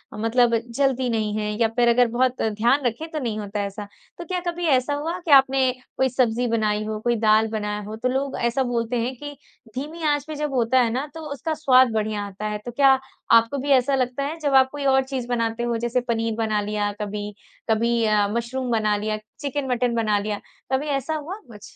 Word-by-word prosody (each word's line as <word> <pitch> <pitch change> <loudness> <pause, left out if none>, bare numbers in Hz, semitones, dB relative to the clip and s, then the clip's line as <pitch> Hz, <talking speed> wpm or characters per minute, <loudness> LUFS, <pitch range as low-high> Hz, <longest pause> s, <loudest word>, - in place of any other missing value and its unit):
मतलब 230 +2 +2 0.2
जलती 265 -2 +1
नहीं 215 -2 -1
हैं 210 0 -2
या 230 - +4
फिर 240 -1 +3
अगर 245 +1 +4
बहुत 250 +2 0
ध्यान 235 +6 +1
रखे 245 +7 -2
तो 310 - -1
नहीं 230 -6 -3
होता 205 0 -4
ऐसा। 200 +1 -7 0.3
तो 345 - -7
क्या 360 +2 -2
कभी 345 0 -2
ऐसा 265 0 +2
हुआ 320 +5 -3
कि 335 -4 -4
आपने 265 -1 +5 0.3
कोई 265 0 +2
सब्जी 245 -1 +1
बनाई 215 -2 0
हो, 215 0 -3
कोई 240 +2 +1
दाल 215 0 +4
बनाया 210 -1 -2
हो 210 +2 -7
तो 245 +3 -1
लोग 270 +1 -2
ऐसा 235 +3 +1
बोलते 240 -1 -1
हैं 255 +3 -2
कि 290 +3 -8 0.4
धीमी 310 +5 -5
आँच 290 -2 +1
पे 310 - -5
जब 295 -1 -3
होता 250 +1 +3
है 235 - +2
ना, 260 +5 -1
तो 325 - -8
उसका 315 +3 -3
स्वाद 260 -5 +4
बढ़िया 215 -1 -1
आता 200 +1 -7
है, 210 0 -2
तो 210 +4 -8
क्या 270 +2 +5 0.4
आपको 230 +4 +5
भी 280 +2 -4
ऐसा 270 +1 +4
लगता 255 +1 -1
है, 305 +4 -3
जब 290 -3 -1
आप 265 0 +6
कोई 290 -1 -5
और 265 0 +4
चीज़ 260 -2 -4
बनाते 230 -1 -1
हो 240 -1 0
जैसे 240 +2 0
पनीर 225 -1 0
बना 215 -2 0
लिया, 205 0 -1
कभी 210 0 -4 0.4
कभी 230 +1 +2
अ, 210 -1 +3
मशरूम 245 +3 -3
बना 215 -2 +2
लिया, 215 +1 -2 0.2
चिकन-मटन 255 -4 -1
बना 215 -2 +2
लिया, 205 0 -3 0.3
कभी 280 +3 0
ऐसा 280 +2 -1
हुआ 310 +5 -5
कुछ? 210 -4 -13
240 Hz, 220 wpm, -23 LUFS, 220-270 Hz, 0.4 s, आप